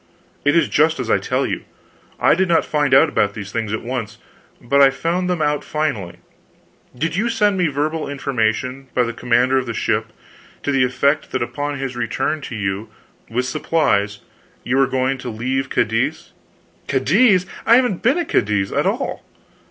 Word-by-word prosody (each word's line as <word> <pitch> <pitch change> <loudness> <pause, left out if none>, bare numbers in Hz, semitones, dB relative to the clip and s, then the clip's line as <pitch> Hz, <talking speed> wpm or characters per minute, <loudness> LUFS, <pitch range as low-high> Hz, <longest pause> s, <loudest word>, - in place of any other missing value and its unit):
"It 145 +2 +3
is 165 -3 +4
just 160 +1 +2
as 120 -3 -2
I - - +4
tell - - -1
you. - - -3 0.6
I - - +5
did 190 +2 +1
not 170 -1 +3
find 145 -2 0
out 140 +3 +5 0.2
these 100 -2 -7
things 110 -2 -3
at 110 - -3
once, 115 -3 -4 0.4
but 140 +4 +2
I 135 - +8
found 170 +6 -1
them 175 -4 0
out 150 0 0
finally. 140 - -2 0.8
Did 165 +5 -1
you 220 +5 0
send 210 -3 +2
me 180 -3 +2
verbal 150 +2 -2
information, 130 -1 -2
by 125 - +3
the 115 -1 -3
commander 125 +2 +2
of 130 - -5
the 115 - -4
ship, - - 0 0.6
to 145 - 0
the 135 -2 +3
effect 140 +4 +1
that 130 - 0
upon 145 +3 -4
his 135 -2 -4
return 120 +6 -2
to 115 - -6
you, 100 +1 -3 0.4
with 125 +2 -1
supplies, 130 -8 0 0.4
you 130 +2 0
were 135 -1 +4
going 130 0 0
to 125 - -6
leave 130 +4 -2
Cadiz 115 +1 -1 0.3
" - - -36
"Cadiz! 185 - +3 0.2
I 230 - +7
haven't 245 -7 +2
been 270 +8 +3
at 345 - -1
Cadiz 100 -2 +1
at - - +1
all!" - - -2
135 Hz, 185 wpm, -20 LUFS, 120-155 Hz, 0.8 s, I